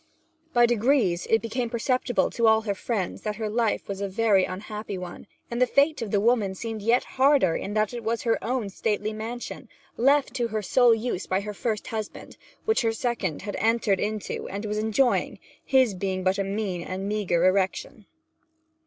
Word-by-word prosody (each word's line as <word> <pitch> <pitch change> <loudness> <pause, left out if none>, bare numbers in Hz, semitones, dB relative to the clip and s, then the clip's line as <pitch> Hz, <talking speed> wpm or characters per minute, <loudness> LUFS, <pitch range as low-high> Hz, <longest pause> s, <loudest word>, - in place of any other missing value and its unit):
By 240 -3 +5
degrees 235 -6 +2
it 225 0 +2
became 235 +1 -2
perceptible 245 +1 0
to 235 -1 +2
all 220 0 +5
her 210 -2 -2
friends 200 -2 -3
that 210 -1 -3
her 215 -1 -3
life 225 -1 0
was 200 0 -5
a 200 - -1
very 200 -2 +3
unhappy 210 +1 -6
one; 180 +2 -8 0.2
and 235 +1 -2
the 250 - +5
fate 285 +4 +2
of 225 - -3
the 205 - 0
fair - - +1
woman 220 -5 +2
seemed 225 +1 -5
yet 230 +4 +3
the - - -18
harder 265 - +3
in 205 - -4
that 215 +1 +1
it 240 -1 -5
was 225 +1 -1
her 230 -1 0
own 235 -4 -2
stately 210 +1 -1
mansion, 230 +3 -6 0.3
left 275 +1 +3
to 245 -3 0
her 215 -2 -3
sole 240 +3 +5
use 225 -4 -3
by 190 +1 0
her 210 +1 -5
first 215 +1 -2
husband, 220 -2 -6 0.3
which 440 0 +2
her 225 -2 +1
second 225 - -2
had 205 0 -4
entered 220 -3 +2
into 210 0 -3
and 200 +3 -5
was 210 0 -2
enjoying, 220 +4 +1 0.3
his 260 -5 +3
being 185 0 -3
but 185 +1 +1
a - - +2
mean 195 -2 -3
and 185 +3 -4
meagre 195 -5 +1
erection. 190 +2 0
220 Hz, 195 wpm, -26 LUFS, 200-235 Hz, 0.3 s, By